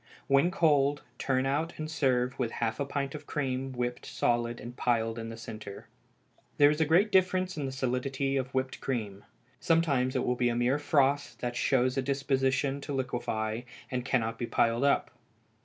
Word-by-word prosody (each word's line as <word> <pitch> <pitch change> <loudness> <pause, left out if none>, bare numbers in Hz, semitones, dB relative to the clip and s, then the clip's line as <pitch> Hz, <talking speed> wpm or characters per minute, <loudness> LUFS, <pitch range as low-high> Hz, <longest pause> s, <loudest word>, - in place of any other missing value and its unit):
When 140 +5 +4
cold, 145 -5 +2 0.2
turn 130 -1 +1
out 150 +5 0
and 155 - -4
serve 130 -5 0
with 120 -3 -1
half 110 -1 -2
a 140 - 0
pint 140 0 -3
of 150 -1 -8
cream 135 -3 -2
whipped 125 -1 -3
solid 120 0 0
and 120 +1 -8
piled 115 -2 0
in 115 0 -5
the 115 - -7
centre. 110 -3 -8 0.7
There 145 0 +7
is 150 +1 -1
a 160 - +3
great 185 +7 +4
difference 185 0 +2
in 145 -3 -3
the - - -4
solidity 130 +1 -1
of 130 -1 -1
whipped 130 0 -2
cream. 105 -6 -3 0.4
Sometimes 140 -6 +2
it 130 - +1
will 125 - +2
be 120 0 +1
a 120 - -1
mere 125 +4 +2
froth 145 -1 +1
that 120 -1 -2
shows 130 0 +2
a - - +3
disposition 135 0 0
to 145 - -5
liquefy, 120 -4 -2 0.3
and 125 -1 -1
cannot 115 -3 0
be 120 - -2
piled 115 +2 +2
up. 140 - +2
130 Hz, 185 wpm, -29 LUFS, 120-140 Hz, 0.7 s, There